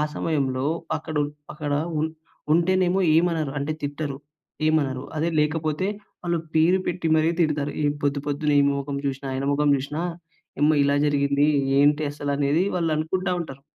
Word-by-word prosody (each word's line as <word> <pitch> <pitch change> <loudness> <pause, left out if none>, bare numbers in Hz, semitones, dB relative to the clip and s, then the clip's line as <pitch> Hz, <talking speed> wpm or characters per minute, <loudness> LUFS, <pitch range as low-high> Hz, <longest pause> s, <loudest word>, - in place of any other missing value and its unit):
సమయంలో 135 -4 -1 0.3
అక్కడ 155 0 -7 0.4
అక్కడ 150 -2 -3 0.3
ఉ - - +1 0.5
ఉంటేనేమో 185 +2 +2 0.2
ఏమనరు 165 -3 +1
అంటే 145 +2 -2
తిట్టరు 145 -1 -3 0.5
ఏమనరు. 140 -5 +1
అదే 155 +2 0
లేకపోతే 155 +3 0 0.4
వాళ్ళు 170 -1 0 0.2
పేరు 170 +4 +4
పెట్టి 175 -1 -1
మరి 155 +1 +3
తిడతారు. 150 -3 0 0.3
"పొద్దు 140 0 +1
పొద్దున్న 145 0 0
ఈ - - +3
మొఖం 140 0 -3
చూసినా, 135 0 -3
ఆయన 135 +1 -2
మొఖం 145 +1 +2
చూసినా, 145 +4 -4 0.6
ఇమ్మా 150 +1 +5
ఇలా 140 0 +2
జరిగింది 140 0 +2 0.3
ఏంటి 145 +2 +4
అసలు?" 145 -1 -4
అనేది 145 +4 +2
వాళ్ళు 165 -3 0
అనుకుంటా 180 +4 -1
ఉంటారు. 135 -4 -9
150 Hz, 145 wpm, -24 LUFS, 140-160 Hz, 0.6 s, ఇమ్మా